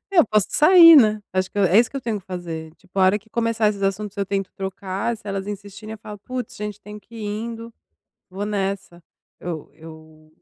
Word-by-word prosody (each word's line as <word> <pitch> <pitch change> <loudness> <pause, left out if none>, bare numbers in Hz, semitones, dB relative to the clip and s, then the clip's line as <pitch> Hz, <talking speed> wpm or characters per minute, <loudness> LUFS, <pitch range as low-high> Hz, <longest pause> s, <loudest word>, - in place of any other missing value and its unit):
Eu 345 - +5
posso 210 -1 +2
sair, 330 0 +8
né. 215 -5 +5
Acho 185 0 -1
que 205 - -5
é 190 +1 +5
isso 235 - +3
que 275 - -6
eu - - -3
tenho 225 -4 -3
que - - -31
fazer, 165 -4 -6
tipo, 185 0 -10
a - - +4
hora 195 +3 +4
que 220 +1 -27
começar 230 -2 +1
esses 200 -1 -3
assuntos 195 +1 -2
eu 200 -1 -1
tento 195 -1 -2
trocar, 195 +3 -3
se 220 -1 -19
elas 195 0 -3
insistirem 205 +1 -8
eu 220 - -8
falo: 210 -1 -10
"Puts, 250 +2 -6
gente 210 0 -6
tenho 210 0 -10
que 230 - -19
ir 220 - -6
indo, 230 +2 -5 0.6
vou 195 +3 -5
nessa, 195 -3 -3 0.4
eu 165 -4 -6
eu 155 0 -15
205 Hz, 220 wpm, -22 LUFS, 190-220 Hz, 0.6 s, sair